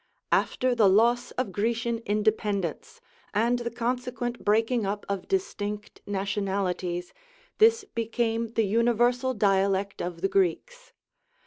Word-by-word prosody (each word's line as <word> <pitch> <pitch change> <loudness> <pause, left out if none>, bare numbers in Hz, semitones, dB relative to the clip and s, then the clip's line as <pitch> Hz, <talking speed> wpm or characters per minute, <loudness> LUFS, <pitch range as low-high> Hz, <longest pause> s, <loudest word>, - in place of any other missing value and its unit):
After 255 0 +2
the 220 -5 +5
loss 240 +5 +3
of 255 -6 -1
Grecian 230 +3 -1
independence, 210 - -1 0.3
and 235 +3 +2
the 235 0 -3
consequent 245 +1 -3
breaking 225 +3 +2
up 205 +1 -3
of 200 -2 -3
dis 385 0 0
tinct 205 0 -6
nationalities, 190 -3 -2 0.5
this 455 0 +5
became 230 - -1
the 225 - +2
universal 240 +4 +2
dialect 195 -1 +1
of 175 -1 -5
the - - +2
Greeks. 340 - -1
225 Hz, 120 wpm, -27 LUFS, 200-240 Hz, 0.5 s, the